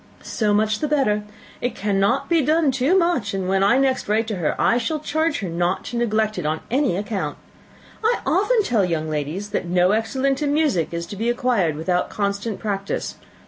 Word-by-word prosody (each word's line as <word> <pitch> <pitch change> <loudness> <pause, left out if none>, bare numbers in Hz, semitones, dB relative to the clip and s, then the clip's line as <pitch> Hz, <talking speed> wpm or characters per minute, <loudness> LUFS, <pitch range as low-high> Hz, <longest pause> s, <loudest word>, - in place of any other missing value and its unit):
"So 215 -2 -1
much 215 +1 +2
the 305 - -1
better. 270 -8 +1 0.4
It 245 - -2
cannot 200 +7 +1
be 335 -2 +3
done 305 +1 +2
too 265 +8 +2
much; 305 - +1
and 190 -1 -2
when 190 +1 +1
I 205 +5 +4
next 265 -5 +1
write 220 +2 +2
to 210 - -2
her, 165 -4 -1
I 235 - +3
shall 310 +7 -1
charge 315 -1 -1
her 195 - -3
not 175 +2 -1
to - - -6
neglect 215 -3 0
it 165 - -4
on 155 +1 -1
any 260 -8 +1
account. 195 -7 -3 0.7
I 465 +2 +3
often 430 +3 +2
tell 230 - +1
young 160 -3 -1
ladies, 155 +7 -3
that - - -2
no 180 +1 +3
excellence 260 +6 0
in 290 -1 +1
music 290 - +1
is 170 0 -3
to 205 - -8
be 225 +4 -1
acquired 240 - +1
without 175 +3 -1
constant 200 +1 -2
practice. 200 -2 -3
215 Hz, 200 wpm, -22 LUFS, 190-270 Hz, 0.7 s, I